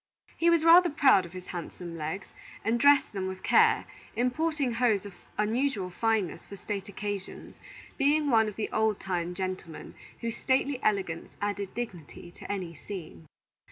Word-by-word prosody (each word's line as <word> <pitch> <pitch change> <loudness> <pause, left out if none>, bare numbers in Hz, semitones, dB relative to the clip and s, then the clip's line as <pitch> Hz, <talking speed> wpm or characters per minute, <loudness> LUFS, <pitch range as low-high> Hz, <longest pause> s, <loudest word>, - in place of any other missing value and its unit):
He 340 - +3
was 335 -1 +3
rather 345 +1 +8
proud 265 - +4
of 170 - -17
his 185 -1 -8
handsome 175 -1 -6
legs, 160 +4 -5 0.4
and 230 +1 +2
dressed 285 -1 +5
them 190 -2 -2
with 190 0 -6
care, - - +4 0.3
importing 275 +2 0
hose 230 -4 +2
of 200 - -8 0.2
unusual 215 -2 0
fineness 220 -2 0
for 200 - -8
state 200 0 -5
occasions; 205 -1 -6 0.4
being 290 +1 +3
one 220 -2 +5
of 210 - -5
the 220 - -3
old 220 -2 +1
time 180 -2 -3
gentlemen 185 -3 -5 0.3
whose 230 -1 -3
stately 265 0 +1
elegance 190 -6 -1
added 205 -1 -3
dignity 175 -7 -7
to - - -8
any 185 -4 -4
scene. 160 - -9
205 Hz, 155 wpm, -29 LUFS, 185-250 Hz, 0.4 s, rather